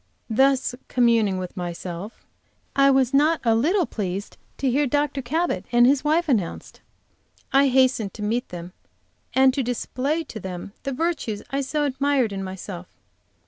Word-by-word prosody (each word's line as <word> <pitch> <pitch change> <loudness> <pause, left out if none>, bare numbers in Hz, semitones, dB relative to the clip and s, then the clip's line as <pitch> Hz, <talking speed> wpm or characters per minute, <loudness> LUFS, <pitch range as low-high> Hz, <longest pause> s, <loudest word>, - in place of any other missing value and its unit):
Thus 265 +2 +3
communing 230 -6 +3
with 185 -1 -6
myself, 175 +3 -6 0.5
I 275 0 +5
was 265 -1 +3
not 305 +4 +4
a 230 -2 +3
little 330 - +2
pleased 195 -1 -4 0.2
to 275 - -1
hear 275 +3 +2
Dr. 290 +1 0
Cabot 320 +8 -1
and 240 0 +6
his 275 +2 +3
wife 320 +3 +2
announced. 215 - -2 0.7
I 275 +1 +5
hastened 255 -5 +2
to 210 - -6
meet 235 +4 -1
them 175 0 -8 0.6
and 265 0 +5
to 275 - 0
display 260 +5 -2
to 220 - -8
them 185 0 -7
the 275 - -3
virtues 275 -8 -2
I 275 +1 0
so 295 +2 -1
admired 275 -4 +1
in 195 0 -4
myself. 185 -1 -7
255 Hz, 155 wpm, -24 LUFS, 205-280 Hz, 0.7 s, and